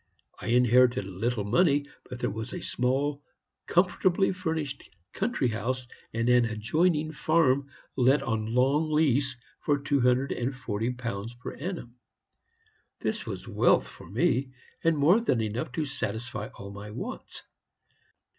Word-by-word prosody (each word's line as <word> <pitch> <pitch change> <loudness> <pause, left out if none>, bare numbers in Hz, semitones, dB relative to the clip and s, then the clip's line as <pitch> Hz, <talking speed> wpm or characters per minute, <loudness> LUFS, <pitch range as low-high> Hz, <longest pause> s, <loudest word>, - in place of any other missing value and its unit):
I - - -6
inherited 125 0 +4
little 105 +4 -2
money; 145 - +3 0.2
but 125 - -6
there - - -1
was 110 +3 -5
a - - -5
small, 140 +3 0 0.5
comfortably 185 +1 +3
furnished 160 -6 -3 0.3
country 195 - 0
house, 120 +3 -2 0.2
and 115 +1 -1
an 125 -1 +5
adjoining 150 +9 +1
farm 140 -3 +2 0.3
let 135 +2 +4
on 110 -4 -1
a - - -4
long 135 +6 +2
lease 140 -4 +2 0.2
for 145 -1 +1
two 140 -1 0
hundred 125 +3 +3
and 125 +3 -2
forty 115 -3 -2
pounds 115 -2 -5
per 125 - -7
annum. 140 -7 -6 1.0
This - - -2
was - - -6
wealth - - +3
for - - -13
me, 135 -6 +1 0.3
and 165 -1 +3
more 170 +10 +5
than 130 - +1
enough 115 +7 -2
to 155 +3 -1
satisfy 115 -5 -4
all 100 0 -8
my 100 +1 -8
wants. 110 +4 -7
130 Hz, 145 wpm, -28 LUFS, 115-150 Hz, 1.0 s, an